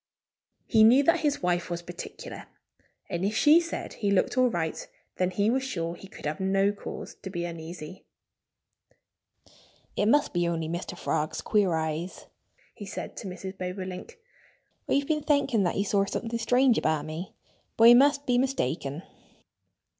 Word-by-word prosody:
He 220 Hz, -2 st, +5 dB
knew 250 Hz, +6 st, +7 dB
that 335 Hz, +4 st, +3 dB
his 290 Hz, -, 0 dB
wife 175 Hz, -1 st, 0 dB
was 175 Hz, 0 st, -4 dB
particular. 175 Hz, 0 st, -8 dB, 0.6 s
And 175 Hz, +1 st, -3 dB
if 205 Hz, +3 st, 0 dB
she 305 Hz, +3 st, +7 dB
said 335 Hz, -1 st, -5 dB
he 205 Hz, -, -2 dB
looked 200 Hz, +3 st, +2 dB
all 255 Hz, -1 st, +4 dB
right 165 Hz, -6 st, -3 dB, 0.3 s
then 185 Hz, 0 st, +1 dB
he 205 Hz, +4 st, +1 dB
was 265 Hz, +2 st, +1 dB
sure 170 Hz, -11 st, -3 dB
he 185 Hz, +3 st, -11 dB
could 195 Hz, -, -12 dB
have 150 Hz, +1 st, -2 dB
no 195 Hz, +1 st, +2 dB
cause 205 Hz, -, -8 dB
to 190 Hz, -, -6 dB
be 175 Hz, -2 st, -3 dB
uneasy. 165 Hz, 0 st, -8 dB, 1.9 s
"It 205 Hz, -, +1 dB
must 290 Hz, +5 st, +3 dB
be 175 Hz, -1 st, +1 dB
only 165 Hz, -2 st, -2 dB
Mr. 175 Hz, +2 st, -5 dB
Frog's 155 Hz, -3 st, -2 dB
queer 200 Hz, -6 st, +2 dB
eyes," 160 Hz, +3 st, -3 dB, 0.5 s
he 205 Hz, -, -9 dB
said -, -, -6 dB
to 210 Hz, -, -6 dB
Mrs. 190 Hz, +1 st, -7 dB
Bobolink. 185 Hz, -, -6 dB, 0.7 s
"I've 280 Hz, 0 st, +2 dB
been 305 Hz, 0 st, 0 dB
thinking 285 Hz, -7 st, +2 dB
that 175 Hz, -, 0 dB
he 200 Hz, -, +1 dB
saw 200 Hz, -1 st, +1 dB
something 230 Hz, +3 st, -3 dB
strange 245 Hz, +1 st, +3 dB
about 155 Hz, -2 st, 0 dB
me. 160 Hz, +4 st, -7 dB, 0.4 s
But 230 Hz, +1 st, +8 dB
I -, -, +10 dB
must 280 Hz, +3 st, +4 dB
be 245 Hz, -1 st, +2 dB
mistaken." 165 Hz, -, -1 dB
195 Hz, 165 wpm, -27 LUFS, 175-245 Hz, 1.9 s, I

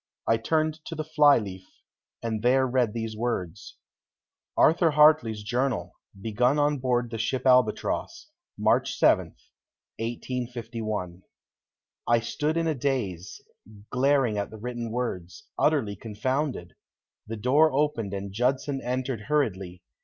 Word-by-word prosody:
I 115 Hz, -, +4 dB
turned 155 Hz, +6 st, -1 dB
to 165 Hz, -, -6 dB
the 155 Hz, -, -3 dB
fly 150 Hz, -2 st, +5 dB
leaf 95 Hz, -3 st, -6 dB, 0.6 s
and 110 Hz, -2 st, -2 dB
there 130 Hz, +3 st, +3 dB
read 125 Hz, -4 st, +1 dB
these 115 Hz, -1 st, -4 dB
words: 105 Hz, -6 st, -4 dB, 0.8 s
"Arthur 165 Hz, +1 st, +5 dB
Hartley's 150 Hz, -8 st, +4 dB
journal. 125 Hz, +3 st, -1 dB, 0.3 s
Begun 125 Hz, +7 st, +1 dB
on 145 Hz, -1 st, +2 dB
board 125 Hz, -2 st, 0 dB
the 115 Hz, -, -4 dB
ship 125 Hz, +4 st, -2 dB
Albatross, 125 Hz, -, +1 dB, 0.3 s
March -, -, +2 dB
7, -, -, +4 dB, 0.7 s
1851." 115 Hz, -5 st, -4 dB, 0.9 s
I 120 Hz, 0 st, +4 dB
stood 150 Hz, +7 st, -2 dB
in 165 Hz, -, +1 dB
a 160 Hz, -, +1 dB
daze, 120 Hz, -, -3 dB, 0.5 s
glaring 130 Hz, -4 st, +2 dB
at 100 Hz, -, -3 dB
the 110 Hz, -, -10 dB
written 120 Hz, +1 st, -5 dB
words, 115 Hz, -, -4 dB
utterly 135 Hz, -10 st, +2 dB
confounded. 115 Hz, -, -3 dB, 0.5 s
The 115 Hz, +1 st, -5 dB
door 145 Hz, +8 st, +4 dB
opened 135 Hz, -8 st, 0 dB
and 100 Hz, -1 st, -5 dB
Judson 135 Hz, +4 st, 0 dB
entered 125 Hz, -3 st, -3 dB
hurriedly. 95 Hz, -12 st, -1 dB
125 Hz, 125 wpm, -26 LUFS, 110-140 Hz, 0.9 s, fly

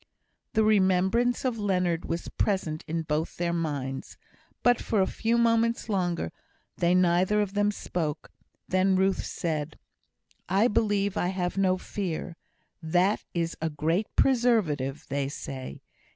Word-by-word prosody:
The 220 Hz, -, +3 dB
remembrance 210 Hz, +4 st, +3 dB
of 240 Hz, -3 st, 0 dB
Leonard 180 Hz, -4 st, 0 dB
was 170 Hz, +1 st, -3 dB
present 170 Hz, -6 st, -1 dB
in 165 Hz, +1 st, -2 dB
both 155 Hz, +1 st, -2 dB
their 170 Hz, 0 st, 0 dB
minds; 140 Hz, -5 st, -3 dB, 0.5 s
but 245 Hz, -1 st, +4 dB
for 215 Hz, -, 0 dB
a 190 Hz, -, +4 dB
few 230 Hz, +4 st, 0 dB
moments 230 Hz, 0 st, +2 dB
longer 175 Hz, -, -1 dB, 0.4 s
they 175 Hz, +1 st, +2 dB
neither 185 Hz, +3 st, +3 dB
of 205 Hz, -2 st, -1 dB
them 205 Hz, 0 st, +2 dB
spoke. 165 Hz, -7 st, -3 dB, 0.4 s
Then 185 Hz, +1 st, +2 dB
Ruth 190 Hz, +1 st, +2 dB
said: 155 Hz, -3 st, -3 dB, 0.7 s
"I 195 Hz, +6 st, +4 dB
believe 205 Hz, -2 st, +1 dB
I -, -, +1 dB
have 180 Hz, -1 st, -2 dB
no 190 Hz, -1 st, +2 dB
fear. 180 Hz, -3 st, -4 dB, 0.5 s
That 180 Hz, +5 st, +2 dB
is 170 Hz, -1 st, -1 dB
a 160 Hz, -, 0 dB
great 165 Hz, +7 st, 0 dB
preservative, 210 Hz, -, +2 dB
they 140 Hz, 0 st, -1 dB
say. 135 Hz, -2 st, -7 dB
185 Hz, 135 wpm, -27 LUFS, 165-205 Hz, 0.7 s, but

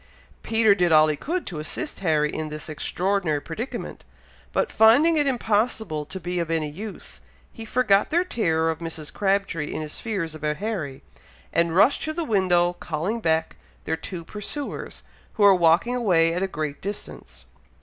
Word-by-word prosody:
Peter 225 Hz, -2 st, +4 dB
did 180 Hz, -3 st, +1 dB
all 155 Hz, 0 st, +7 dB
he 150 Hz, -, 0 dB
could 340 Hz, -, -3 dB
to 165 Hz, -5 st, -5 dB
assist 295 Hz, -, -4 dB
Harry 155 Hz, -5 st, +1 dB
in 155 Hz, -1 st, -3 dB
this 150 Hz, 0 st, -7 dB
extraordinary 175 Hz, 0 st, -1 dB
predicament, 190 Hz, -, -6 dB, 0.5 s
but 485 Hz, -, 0 dB
finding 250 Hz, +10 st, +5 dB
it 295 Hz, -2 st, +2 dB
impossible 220 Hz, -, 0 dB
to 190 Hz, -, -6 dB
be 180 Hz, 0 st, -3 dB
of 170 Hz, -1 st, -2 dB
any 160 Hz, -2 st, 0 dB
use, 205 Hz, +7 st, -9 dB, 0.3 s
he 225 Hz, -, -8 dB
forgot 215 Hz, -4 st, +2 dB
their 345 Hz, +3 st, +2 dB
terror 165 Hz, -, +1 dB
of 160 Hz, -, -6 dB
Mrs. 165 Hz, -3 st, -6 dB
Crabtree 195 Hz, -6 st, 0 dB
in 155 Hz, -, -3 dB
his 150 Hz, -, -7 dB
fears 190 Hz, -8 st, -3 dB
about 150 Hz, -1 st, -2 dB
Harry, 190 Hz, -11 st, -4 dB, 0.5 s
and 170 Hz, 0 st, +2 dB
rushed 260 Hz, +9 st, +4 dB
to 310 Hz, -, -2 dB
the 335 Hz, +1 st, -2 dB
window, 180 Hz, -, +2 dB
calling 175 Hz, +7 st, -3 dB
back 160 Hz, -5 st, 0 dB, 0.3 s
their -, -, 0 dB
two 170 Hz, +1 st, -7 dB
pursuers, 215 Hz, -, -6 dB, 0.3 s
who 210 Hz, -, 0 dB
were 200 Hz, -1 st, +8 dB
walking 175 Hz, +7 st, +3 dB
away 170 Hz, -9 st, +3 dB
at 180 Hz, -, -2 dB
a 195 Hz, -, +1 dB
great 155 Hz, -5 st, -4 dB
distance. 200 Hz, +2 st, -7 dB
180 Hz, 170 wpm, -24 LUFS, 160-220 Hz, 0.5 s, were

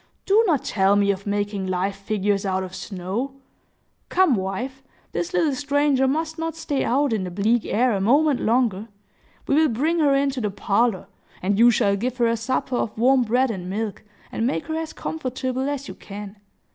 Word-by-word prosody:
"Do 420 Hz, +3 st, +4 dB
not 305 Hz, -7 st, +2 dB
tell 195 Hz, 0 st, +2 dB
me 200 Hz, 0 st, +3 dB
of 200 Hz, +1 st, -6 dB
making 205 Hz, -1 st, -1 dB
live 185 Hz, +2 st, -1 dB
figures 200 Hz, 0 st, -1 dB
out 190 Hz, -1 st, -1 dB
of 185 Hz, 0 st, -8 dB
snow. 200 Hz, +8 st, -4 dB, 0.7 s
Come, 370 Hz, -6 st, +4 dB
wife; 240 Hz, +7 st, -3 dB, 0.3 s
this 175 Hz, 0 st, -3 dB
little 280 Hz, -, +2 dB
stranger 285 Hz, 0 st, +2 dB
must 320 Hz, +3 st, -2 dB
not 325 Hz, 0 st, -3 dB
stay 290 Hz, -4 st, -2 dB
out 275 Hz, +1 st, +1 dB
in 210 Hz, -4 st, -1 dB
the 180 Hz, -, -4 dB
bleak 210 Hz, +6 st, +1 dB
air 250 Hz, +3 st, +2 dB
a 195 Hz, -, -1 dB
moment 280 Hz, +6 st, +3 dB
longer. 225 Hz, -3 st, +1 dB, 0.6 s
We -, -, +1 dB
will 310 Hz, +1 st, +4 dB
bring 305 Hz, +9 st, 0 dB
her 285 Hz, -3 st, +4 dB
into 275 Hz, -2 st, 0 dB
the 210 Hz, -, 0 dB
parlor; 200 Hz, +1 st, 0 dB, 0.4 s
and 200 Hz, +2 st, +1 dB
you 240 Hz, +1 st, +8 dB
shall 200 Hz, -3 st, +2 dB
give 245 Hz, +5 st, -3 dB
her 240 Hz, -, +2 dB
a 230 Hz, 0 st, +2 dB
supper 250 Hz, +2 st, -1 dB
of 215 Hz, -, -3 dB
warm 255 Hz, +3 st, +4 dB
bread 250 Hz, +3 st, +2 dB
and 180 Hz, -4 st, -6 dB
milk, 210 Hz, +1 st, -3 dB, 0.3 s
and 230 Hz, -, -1 dB
make 165 Hz, -10 st, -2 dB
her 315 Hz, -, -3 dB
as 320 Hz, 0 st, -3 dB
comfortable 260 Hz, -2 st, -3 dB
as 280 Hz, -1 st, -4 dB
you -, -, -7 dB
can. 205 Hz, 0 st, -9 dB
235 Hz, 195 wpm, -23 LUFS, 200-275 Hz, 0.7 s, you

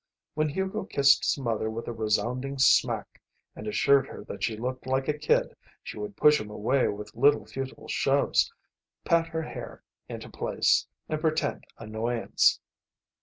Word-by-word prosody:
When 155 Hz, 0 st, 0 dB
Hugo 190 Hz, +6 st, -3 dB
kissed 140 Hz, -8 st, +4 dB
his -, -, +1 dB
mother 115 Hz, -4 st, -1 dB
with 115 Hz, +1 st, -6 dB
a 120 Hz, -, -3 dB
resounding 120 Hz, +5 st, -1 dB
smack 130 Hz, -, +2 dB, 0.3 s
and 110 Hz, -, -8 dB
assured 135 Hz, +5 st, +3 dB
her -, -, -9 dB
that -, -, -8 dB
she 110 Hz, -2 st, -1 dB
looked 130 Hz, +3 st, -4 dB
like 130 Hz, 0 st, 0 dB
a 150 Hz, -, +1 dB
kid 150 Hz, 0 st, +1 dB, 0.3 s
she -, -, -8 dB
would 105 Hz, -1 st, -6 dB
push 150 Hz, -3 st, +5 dB
him 105 Hz, -, -8 dB
away 120 Hz, +6 st, +1 dB
with 105 Hz, +1 st, -6 dB
little 145 Hz, +5 st, +4 dB
futile 135 Hz, 0 st, -7 dB
shoves, -, -, +2 dB, 0.5 s
pat 165 Hz, 0 st, +3 dB
her 165 Hz, -1 st, -3 dB
hair -, -, -8 dB, 0.3 s
into -, -, -7 dB
place, -, -, +1 dB, 0.2 s
and 155 Hz, 0 st, -3 dB
pretend 155 Hz, -1 st, -1 dB
annoyance. 115 Hz, +2 st, +1 dB
130 Hz, 160 wpm, -27 LUFS, 110-150 Hz, 0.5 s, push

